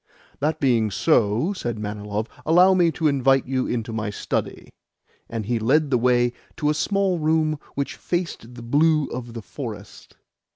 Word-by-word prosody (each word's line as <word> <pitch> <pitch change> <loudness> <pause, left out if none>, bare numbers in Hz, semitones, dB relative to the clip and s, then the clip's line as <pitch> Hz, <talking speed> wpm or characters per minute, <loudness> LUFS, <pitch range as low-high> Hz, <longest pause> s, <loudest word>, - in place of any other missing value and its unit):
"That 155 +2 0
being 120 -5 +2
so," 120 - +2
said 120 - -4
Manilov, 105 0 -4 0.2
"allow 180 +4 +5
me 175 -2 +4
to 160 +2 0
invite 135 -2 +3
you 130 0 -1
into 115 -1 -3
my 110 -1 -2
study." 105 - -4 0.6
And 115 -2 -4
he 120 +1 0
led 140 +6 +2
the 125 - +4
way 120 0 +2 0.2
to 150 -3 +1
a - - +1
small 190 +3 0
room 155 -1 +1 0.2
which 140 0 -3
faced 165 -9 -4
the 120 - -9
blue 150 +4 +3
of 120 -1 -7
the 115 - -6
forest. - - -9
130 Hz, 165 wpm, -23 LUFS, 115-155 Hz, 0.6 s, allow